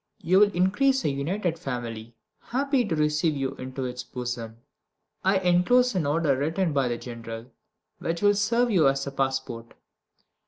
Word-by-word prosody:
You 185 +3 +4
will 205 0 +5
increase 235 +10 +2
a - - +3
united 165 +5 -2
family, 120 -5 -5 0.2
happy 270 +1 0
to 180 -6 -1
receive 150 +1 +1
you 135 0 -2
into 130 0 -5
its 125 0 -4
bosom. 120 -2 -5 0.7
I 190 +1 +3
enclose 190 +8 +3
an 170 -6 0
order 150 -1 +2
written 160 +5 0
by 135 -2 +2
the 120 -1 -2
General, 115 0 -8 0.5
which 170 +3 -3
will 205 0 +6
serve 230 +4 +1
you 170 -8 +4
as 135 0 +1
a 140 - -4
passport. 130 -4 -3
150 Hz, 160 wpm, -26 LUFS, 130-190 Hz, 0.7 s, will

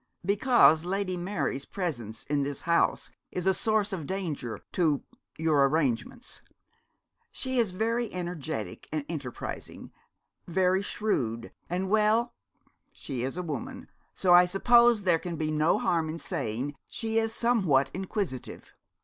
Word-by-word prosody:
'Because 200 -6 +5
Lady 185 +1 -1
Mary's 175 -7 -2
presence 120 - -4
in 145 0 0
this 140 0 -3
house 170 0 +1 0.2
is 180 - -3
a 190 - +5
source 215 -1 +1
of 165 -6 -4
danger 165 -11 -3
to 155 -5 +1 0.3
your 155 -4 +3
arrangements. 140 - -1 0.9
She 260 -1 -1
is 230 -4 +2
very 230 +4 -1
energetic 160 - -5
and 150 -2 -2
enterprising 145 -7 -6 0.6
very 185 +2 +2
shrewd 120 - -2 0.2
and 180 +2 -1
well, 220 +3 +2 0.6
she 130 -4 -5
is 135 +6 -3
a 180 - -2
woman 255 - -6 0.3
so 180 -2 +4
I 175 0 +8
suppose 235 +4 +5
there 175 -3 +3
can 175 0 -5
be 155 -1 -2
no 155 +2 +3
harm 165 -3 0
in 160 - -4
saying 135 - -3
she 225 -1 -1
is 225 0 0
somewhat 185 - +2
inquisitive. 190 - -4
175 Hz, 135 wpm, -28 LUFS, 145-205 Hz, 0.9 s, I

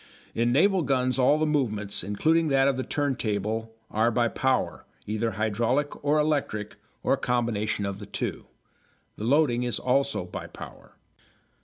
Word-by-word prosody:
In 120 +1 +1
naval 185 +8 +4
guns 130 -3 +1
all 130 +4 +5
the 155 - +1
movements, 110 - 0
including 160 - +2
that 135 -2 +3
of 140 - +2
the 130 - -2
turntable, 110 -6 -2 0.2
are 110 +2 +2
by 120 0 +1
power, 130 +1 0 0.2
either 110 +1 -1
hydraulic 115 +9 -1
or 145 +1 +3
electric, 145 -9 -1 0.3
or - - +3
a - - +2
combination 110 -4 -1
of 100 0 -4
the 100 - -9
two. - - -4 0.7
The 105 - -4
loading 130 -2 +3
is 120 -1 -1
also 135 -5 0
by 90 - -7
power. - - -12
125 Hz, 155 wpm, -26 LUFS, 110-140 Hz, 0.7 s, all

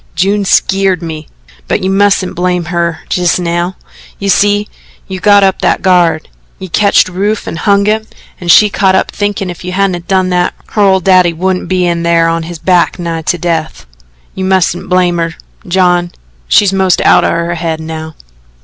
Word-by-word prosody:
June 200 +2 +1
skeered 195 -2 +1
me. 155 -2 -7 0.4
But - - -1
you 190 - 0
mustn't 195 -1 +1
blame 180 0 -1
her 170 -2 -1
jes' 175 -3 +1
now. 175 +1 -2 0.4
You 200 - -3
see, 205 +1 +2 0.4
you 190 -1 -6
got 205 0 +4
up 190 -1 +1
that - - 0
guard. 175 -4 +2 0.3
You 190 - -9
ketched 200 +3 +3
Rufe 200 +4 -2
and 160 - -6
hung 200 +1 +2
him, 220 +1 0 0.3
and 175 - -6
she 210 +4 +7
can't 190 -1 +2
help - - 0
thinkin' 205 -3 -3
if 175 - -11
you 180 0 -5
hadn't 185 -3 -1
done 185 -1 +1
that, 180 -1 0
her 210 - -1
old 190 -2 +3
daddy 185 -2 +4
wouldn't 185 +2 -2
be 185 -1 +1
in 170 -1 -1
thar 170 0 +2
on 165 0 -1
his 165 +1 -7
back 180 +1 +1
nigh 170 -2 -4
to 170 +3 -1
death. 165 - -3 0.5
You 190 - -5
mustn't 185 -2 0
blame 180 -1 +1
her, 165 -1 -2 0.3
John 175 -1 +1 0.4
she's 195 - +3
most 190 -2 +2
out - - +4
o' - - +1
her 170 +1 -2
head 165 -1 -3
now." 160 0 -7
180 Hz, 185 wpm, -11 LUFS, 170-195 Hz, 0.5 s, she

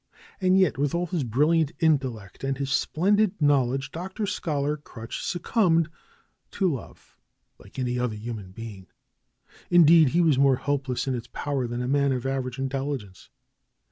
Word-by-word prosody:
And 185 -1 +3
yet, 180 -9 +2
with 145 +2 0
all 175 +1 0
his 175 -4 -2
brilliant 150 +6 +2
intellect 130 - 0
and 135 0 -1
his 140 0 -3
splendid 200 +7 +1
knowledge. 135 -2 +2
Dr. 190 +5 -4
Scholar 150 -7 -1
Crutch 115 -6 -8
succumbed 175 -3 +1 0.6
to 185 -5 +1
love, 130 - -10 0.4
like - - -16
any 125 -1 -1
other 125 -3 -1
human 105 -3 -6
being; 100 -2 -9 0.8
indeed, 165 -3 +7
he 170 +6 +2
was 155 -6 +3
more 135 -1 +5
helpless 135 -1 -2
in 135 - 0
its 120 -1 -5
power 140 -3 -2
than 120 +1 -3
a - - -3
man 140 +1 +2
of 125 -1 -3
average 130 -2 -2
intelligence. 135 -7 -4
140 Hz, 155 wpm, -26 LUFS, 125-165 Hz, 0.8 s, indeed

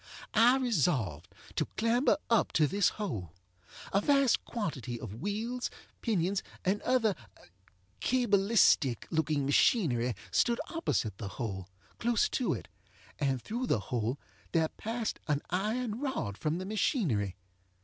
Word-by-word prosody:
I 240 +4 +6
resolved 150 - 0 0.3
to - - +1
clamber 235 +5 +3
up 230 -2 +3
to 155 - +4
this 200 +6 +3
hole. 110 - -4 0.6
A 195 - +4
vast 275 0 +3
quantity 135 - -4
of 110 +3 -8
wheels, 225 +5 -2 0.3
pinions, 195 -3 +1 0.2
and 195 +3 +1
other 245 -5 +2 0.9
cabalistic 200 - +3
looking 155 -3 +1
machinery 130 - +3 0.2
stood 235 -1 +2
opposite 120 - -1
the 105 - -4
hole, 95 -6 -4 0.3
close 235 -1 +2
to 255 - 0
it; - - -8 0.5
and 135 -3 +1
through 240 - -3
the 115 - +2
hole 120 +2 0 0.4
there 160 -2 +3
passed 225 0 -3
an 150 -2 0
iron 215 +5 -1
rod 260 - -2
from 155 +8 -1
the 185 - -4
machinery. 175 - 0
195 Hz, 130 wpm, -31 LUFS, -, 0.9 s, I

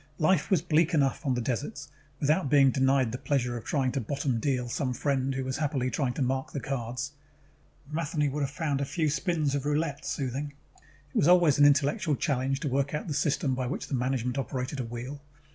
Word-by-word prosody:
Life 180 +4 +2
was 185 -6 +3
bleak 160 +1 +2
enough 140 -1 +1
on 130 - +2
the 120 - -1
deserts, 135 +4 -3 0.3
without 150 +1 +2
being 135 -2 +6
denied 135 -2 +2
the 125 - -4
pleasure 125 -4 0
of 115 - -5
trying 135 -4 0
to 135 - -2
bottom 130 0 -1
deal 125 0 0
some 125 +1 -2
friend 135 0 0
who 135 - -2
was 130 0 -3
happily 135 -4 -1
trying 135 -5 0
to 135 - -1
mark 130 +1 -1
the 140 - -2
cards. 135 0 -3 0.8
Matheny 150 -1 -1
would 145 +2 -2
have 140 - 0
found 145 -1 -1
a - - 0
few 155 +2 0
spins 155 -3 0
of 140 -1 -1
roulette 145 0 -1
soothing: 140 +2 -3 0.2
it 145 0 -28
was 145 - +4
always 175 -5 +5
an 145 - +8
intellectual 145 +1 +2
challenge 135 -2 -1
to - - -2
work 140 +2 0
out 150 - -4
the 155 - -2
system 140 -2 +1
by 130 -1 -2
which 130 - -4
the - - -4
management 125 0 0
operated 130 +1 -3
a - - -1
wheel. 120 +5 -6
140 Hz, 210 wpm, -28 LUFS, 130-150 Hz, 0.8 s, an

